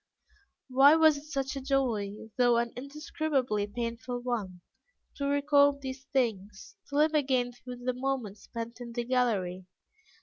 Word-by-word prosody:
Why 270 +3 +6
was 315 -2 +6
it 285 - -10
such 270 -1 -2
a 275 - -4
joy, 245 -7 0 0.2
though 245 -2 +4
an 235 0 -1
indescribably 275 -5 -2
painful 235 +2 -4
one, 205 -8 -3 0.6
to 280 -2 -1
recall 285 0 +4
these 265 -1 -7
things, 215 -8 -2
to 285 - -6
live 305 +2 +4
again 260 -4 +1
through 245 0 -10
the 255 - +1
moments 250 -5 -3
spent 235 +1 -7
in 235 -1 -7
the 240 0 -2
gallery? 205 -8 0
250 Hz, 145 wpm, -29 LUFS, 230-275 Hz, 0.6 s, Why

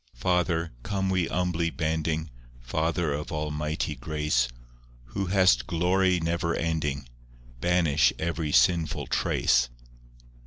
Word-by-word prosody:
III - - -22
Father, 85 +1 +1
come 95 +5 -1
we 90 -2 +1
humbly 85 -1 0
bending,— 80 -1 -2 0.3
Father 80 +5 -1
of 75 +1 -4
Almighty 75 0 -2
grace, 75 -2 0 0.7
Who 100 -1 -2
hast 90 -11 +4
glory 90 +2 +2
never 85 0 -1
ending, 75 -5 -2 0.5
Banish 85 -3 +3
every 80 -2 -2
sinful 80 +6 +3
trace. 60 -1 +2
80 Hz, 110 wpm, -27 LUFS, 75-90 Hz, 0.7 s, hast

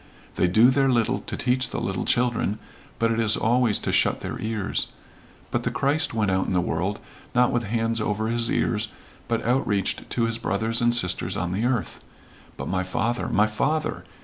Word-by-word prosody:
They 90 - +2
do 110 +8 +5
their 135 0 +2
little 120 -3 +2
to - - -6
teach 125 +1 +1
the - - -3
little 95 -1 -2
children, 120 -4 +1 0.4
but 115 0 +1
it 115 - 0
is 110 -1 +4
always 120 -1 +2
to - - -2
shut - - +2
their - - -5
ears. 110 -3 -1 0.6
But - - 0
the - - -1
Christ 145 +3 0
went 105 -3 0
out 95 0 +1
in - - -1
the 90 - +3
world, 90 +4 -1 0.4
not 125 0 +4
with 120 -2 0
hands 115 +1 0
over 105 +1 -1
his 115 0 0
ears, 110 -1 0 0.4
but 115 -1 -1
outreached 110 -6 0
to 120 - 0
his 115 0 -1
brothers 115 +3 0
and 120 0 +3
sisters 90 -3 0
on 90 -2 -2
the 105 +6 -1
earth. 125 -4 -1 0.6
But - - -5
my 95 0 0
father 110 +6 -1
my 105 - +3
father! 150 +9 -1
115 Hz, 195 wpm, -24 LUFS, 100-120 Hz, 0.6 s, do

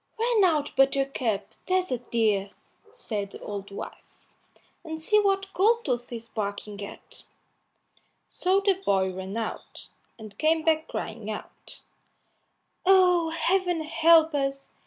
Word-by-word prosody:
"Run 455 -2 +2
out, 305 -5 0
Buttercup, 270 -6 +1 0.2
there's 370 -4 +1
a 250 - 0
dear!" 215 -5 0 0.4
said 210 - -4
the - - -9
old 200 -1 -6
wife, 200 - -8 0.8
"and 320 -1 -6
see 425 +7 +3
what 390 -1 0
Goldtooth 370 - +1
is 230 -1 -6
barking 205 -1 -5
at." 200 - -11 1.1
So 375 +2 +1
the 390 -1 +1
boy 190 - +2
ran 190 +3 -6
out, 225 -1 -6 0.3
and 215 -3 -11
came 315 +1 +2
back 320 0 +2
crying 220 -1 -5
out, 215 - -9 1.0
"Oh, 360 -3 +5
Heaven 355 +1 0
help 325 0 +5
us! 275 -1 -2
295 Hz, 125 wpm, -26 LUFS, 220-365 Hz, 1.1 s, Oh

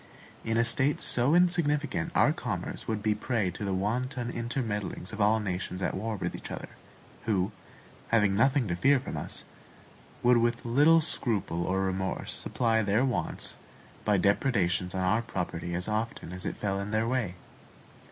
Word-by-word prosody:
In 115 0 0
a 115 - +4
state 130 +5 +2
so 125 +6 +3
insignificant 150 - +2
our - - +5
commerce - - -4
would 110 -2 -2
be 110 - +2
a - - +1
prey 105 -4 -1
to 100 - -7
the 100 - -1
wanton 120 +5 -1
intermeddlings 115 -5 -3
of 110 - -3
all 105 +2 +4
nations 90 -2 -3
at 95 - -1
war 110 +3 -2
with - - -3
each - - -8
other; - - -6 0.6
who, 100 -2 +1 0.6
having 105 -4 +3
nothing 130 +2 +3
to 85 - -1
fear 135 +8 +4
from 130 - -6
us, - - -5 0.8
would 120 0 +6
with 120 +1 +1
little 145 +7 +5
scruple 105 - 0
or 95 +1 +1
remorse, 95 0 -2
supply 115 -2 +1
their 105 +5 +2
wants 125 -4 -2 0.5
by 105 -2 +3
depredations 95 -3 +1
on 95 - 0
our 105 +5 +2
property 85 -6 -4
as 90 +1 -1
often 110 -4 -3
as 90 0 -2
it - - -4
fell 100 -1 -1
in 100 +1 -4
their 110 +1 +1
way. 120 -8 -1
110 Hz, 170 wpm, -29 LUFS, 95-120 Hz, 0.8 s, would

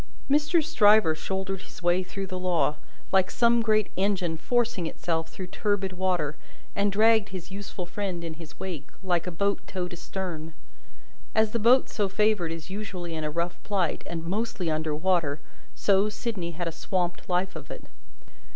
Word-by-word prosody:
Mr. 300 +4 +3
Stryver 215 - +5
shouldered 190 +3 -3
his - - -13
way 175 +1 +4
through 195 +1 -5
the 185 -1 -5
law, 175 -4 +1 0.3
like 190 -1 +4
some 235 0 +4
great 215 -2 +2
engine 185 -3 +1
forcing 225 -1 0
itself 165 0 -2
through 185 - -6
turbid 195 0 -1
water, 180 -5 0 0.4
and 200 0 +2
dragged 220 0 +4
his 185 -1 -7
useful 195 -2 -5
friend 185 -2 -3
in 165 -1 -4
his 160 -2 -12
wake, 170 -7 -5 0.2
like 180 -2 +1
a - - -1
boat 200 +4 +1
towed 180 -2 -3
astern. 170 -3 -5 0.8
As 220 -1 +4
the 235 - 0
boat 245 +4 +6
so 205 -2 -1
favoured 210 -4 +2
is 165 +2 -6
usually 190 -4 -5
in 160 -1 -3
a 150 - 0
rough 170 +3 -2
plight, 190 -6 0
and 165 -1 -4
mostly 190 -2 -1
under 155 0 0
water, 160 -3 +1 0.4
so, 200 +1 +3
Sydney 200 -5 -3
had 175 +1 -3
a - - -1
swamped 180 +2 -2
life 180 +1 +1
of - - -8
it. - - -7
185 Hz, 170 wpm, -27 LUFS, 170-205 Hz, 0.8 s, boat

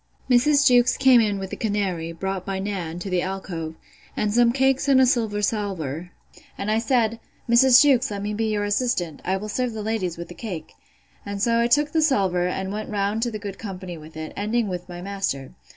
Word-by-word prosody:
Mrs. 280 +3 +4
Jewkes 245 -1 +5
came 260 -3 +6
in 205 -2 0
with 190 -1 -6
the - - -3
canary, 195 -6 -2
brought 190 +2 -4
by 195 0 -3
Nan, 190 -4 -4
to 180 +3 -5
the 180 -1 +1
alcove, 175 -4 -5 0.4
and 210 -1 0
some 240 0 +4
cakes 270 +2 +1
on 265 -1 +6
a 260 - +6
silver 220 -5 0
salver; 180 -7 -2 0.5
and 205 +2 -2
I 220 - +2
said, 230 -1 +1 0.3
Mrs. 245 +3 +7
Jewkes, 265 -2 +3
let 200 -1 -4
me 210 +1 -2
be 225 +2 -1
your 205 -1 0
assistant; 205 - -1
I 190 +1 0
will 210 +2 -6
serve 245 +3 -2
the 215 -1 -5
ladies 205 -6 -2
with 170 0 -7
the - - -8
cake. 175 -7 -7 0.5
And 200 0 -5
so 230 +3 +2
I 235 - +3
took 295 +4 +2
the 320 - +2
salver, 190 - +2
and 190 +2 -3
went 215 +1 -5
round 205 +1 -1
to 240 - 0
the 220 - -5
good 200 -2 -7
company 185 -4 -6
with 155 0 -12
it, 155 0 -6
ending 215 +2 0
with 180 0 -5
my 175 0 -7
master. 195 -9 -3
205 Hz, 215 wpm, -23 LUFS, 185-235 Hz, 0.5 s, Mrs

